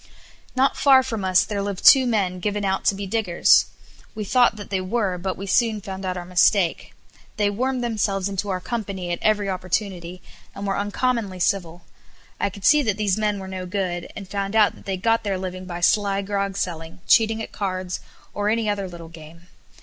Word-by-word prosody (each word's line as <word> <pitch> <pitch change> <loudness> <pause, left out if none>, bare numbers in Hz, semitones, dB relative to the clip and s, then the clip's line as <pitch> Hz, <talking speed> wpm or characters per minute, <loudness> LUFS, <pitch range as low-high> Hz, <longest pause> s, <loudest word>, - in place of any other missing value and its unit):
Not 265 +1 +2
far 265 -2 +6
from 225 -6 -4
us 185 -1 +4
there 205 -2 -3
lived 200 -2 -4
two 265 -2 +8
men 195 -6 0
given 205 +1 -2
out 190 0 -1
to 200 - +3
be 200 +1 -5
diggers. 195 -4 +3 0.5
We 210 -1 -4
thought 245 +2 +3
that 205 -1 -10
they 190 -1 0
were, 190 -2 -1
but 185 +1 -3
we 195 - -6
soon 220 +2 +2
found 190 -1 -7
out 185 0 -2
our 175 - -6
mistake. 180 0 +2 0.4
They 205 -1 +2
wormed 255 +4 -1
themselves 200 -4 -1
into 200 0 -3
our 185 -1 -1
company 195 -4 -4
at 175 - -2
every 210 -2 +2
opportunity, 185 -1 -3 0.3
and 200 - -5
were 195 -1 0
uncommonly 205 -1 -1
civil. 175 -2 -1 0.6
I - - +1
could 200 0 -9
see 300 0 +6
that 210 -7 -1
these 210 -1 0
men 210 -1 0
were 190 -1 -7
no 185 -1 -6
good, 180 -2 -3
and 195 - -8
found 195 +1 -3
out 215 -2 +5
that - - -17
they 190 -1 -1
got 225 +4 +1
their 200 -2 -1
living 185 0 -6
by 175 -1 -6
sly 200 +1 +2
grog 200 -1 -2
selling, 170 -2 -4
cheating 225 0 +4
at 225 - -6
cards, 185 -3 -3 0.3
or 205 0 -1
any 225 0 0
other 200 -2 -1
little 170 -2 -10
game. 165 +2 -14
195 Hz, 205 wpm, -23 LUFS, 185-215 Hz, 0.6 s, two